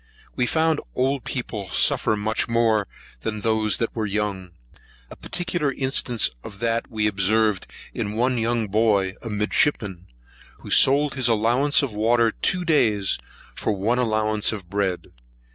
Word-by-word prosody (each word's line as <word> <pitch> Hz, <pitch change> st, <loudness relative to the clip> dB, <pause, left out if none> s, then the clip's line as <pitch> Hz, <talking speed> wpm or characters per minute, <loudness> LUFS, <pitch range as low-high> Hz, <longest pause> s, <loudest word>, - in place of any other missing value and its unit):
We 125 Hz, -, +1 dB
found 160 Hz, +2 st, +1 dB
old 135 Hz, +1 st, 0 dB
people 110 Hz, -7 st, -4 dB
suffer 110 Hz, +4 st, +2 dB
much 110 Hz, +2 st, -1 dB
more 115 Hz, -3 st, +2 dB, 0.3 s
than 110 Hz, -, -4 dB
those 110 Hz, -2 st, +1 dB
that 115 Hz, -, -2 dB
were 110 Hz, -2 st, -1 dB
young. 100 Hz, -2 st, -2 dB, 0.6 s
A -, -, -8 dB
particular 175 Hz, -5 st, -2 dB
instance 130 Hz, -3 st, +1 dB, 0.2 s
of 100 Hz, -, -10 dB
that 115 Hz, +2 st, -1 dB
we 110 Hz, -2 st, -1 dB
observed 105 Hz, 0 st, +1 dB, 0.3 s
in 105 Hz, -, -3 dB
one 125 Hz, +2 st, +1 dB
young 115 Hz, -1 st, 0 dB
boy, 100 Hz, -2 st, +2 dB
a 115 Hz, -, -6 dB
midshipman, 105 Hz, -3 st, 0 dB, 0.5 s
who -, -, -9 dB
sold 140 Hz, +2 st, +4 dB
his 130 Hz, -3 st, 0 dB
allowance 120 Hz, +7 st, +3 dB
of 130 Hz, -6 st, -3 dB
water 115 Hz, +2 st, +2 dB
two 180 Hz, -, 0 dB
days 110 Hz, -, +2 dB, 0.4 s
for -, -, -1 dB
one 110 Hz, +5 st, 0 dB
allowance 110 Hz, -2 st, +1 dB
of 95 Hz, -5 st, -8 dB
bread. 100 Hz, -3 st, -2 dB
110 Hz, 145 wpm, -23 LUFS, 105-125 Hz, 0.6 s, sold